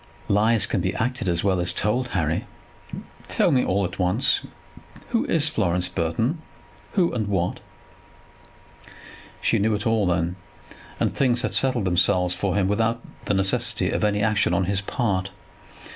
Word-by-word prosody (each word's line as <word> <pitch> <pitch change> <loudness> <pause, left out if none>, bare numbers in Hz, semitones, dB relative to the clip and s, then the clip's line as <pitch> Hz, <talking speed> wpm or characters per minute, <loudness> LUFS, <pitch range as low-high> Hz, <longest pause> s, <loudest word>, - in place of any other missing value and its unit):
"Lies 110 +2 +3
can - - -1
be - - -1
acted 120 -3 -1
as 85 -1 0
well 95 -2 +2
as 85 - 0
told. 125 +5 0
Harry, 80 -7 -1 0.8
tell - - +2
me 130 -2 +3
all 100 +1 +1
at 90 - -7
once. 95 +7 +2 0.7
Who 230 - +1
is 160 -2 +2
Florence 90 - 0
Burton; 110 - -1 0.5
who 180 -4 +2
and 110 -4 -1
what?" 95 -3 -1 1.8
She - - +2
knew 110 +1 +2
it 105 +3 -4
all, 110 -4 +2
then, 85 +1 0 0.6
and - - +1
things 125 -2 +1
had - - -2
settled 130 -6 +1
themselves 90 0 +3
for 95 +1 -1
him 100 -2 +2
without 115 +3 +1 0.3
the 100 - +1
necessity 115 +5 0
of - - -1
any 105 0 +1
action 110 0 +2
on 95 - +2
his 100 +1 -1
part. 95 -3 -1
100 Hz, 160 wpm, -24 LUFS, 90-115 Hz, 1.8 s, Lies